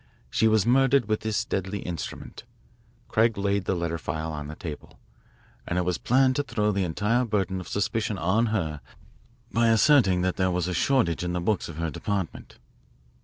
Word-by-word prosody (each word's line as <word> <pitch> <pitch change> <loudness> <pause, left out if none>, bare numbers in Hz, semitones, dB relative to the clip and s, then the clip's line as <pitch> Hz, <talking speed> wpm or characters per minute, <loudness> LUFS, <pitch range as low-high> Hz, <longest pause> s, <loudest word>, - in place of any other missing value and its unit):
She 110 - +3
was 110 -2 +3
murdered 135 0 +3
with 110 -1 0
this 110 -1 -1
deadly 95 +1 -2
instrument" 85 +4 -6 0.6
Craig 115 0 +2
laid 100 -1 0
the 95 - 0
letter 85 -1 -2
file 80 +1 -4
on 75 -1 -5
the 75 - -7
table 80 -5 -8 0.7
"and 90 - -1
it 90 - +1
was 90 -2 -1
planned 130 +1 +3
to 145 - +1
throw 105 -6 0
the 100 -1 0
entire 105 +8 +1
burden 95 -5 -1
of 90 - -8
suspicion 105 0 -1
on 95 +8 +2
her 80 -9 -2 0.7
by 115 0 +2
asserting 115 -5 +4
that 90 0 -1
there 95 -1 +2
was 90 -1 -1
a 90 - -2
shortage 90 - +1
in 90 0 -2
the 90 - -1
books 90 +2 -1
of 80 - -9
her 85 -1 -2
department." 95 +3 -4
100 Hz, 185 wpm, -26 LUFS, 90-110 Hz, 0.7 s, asserting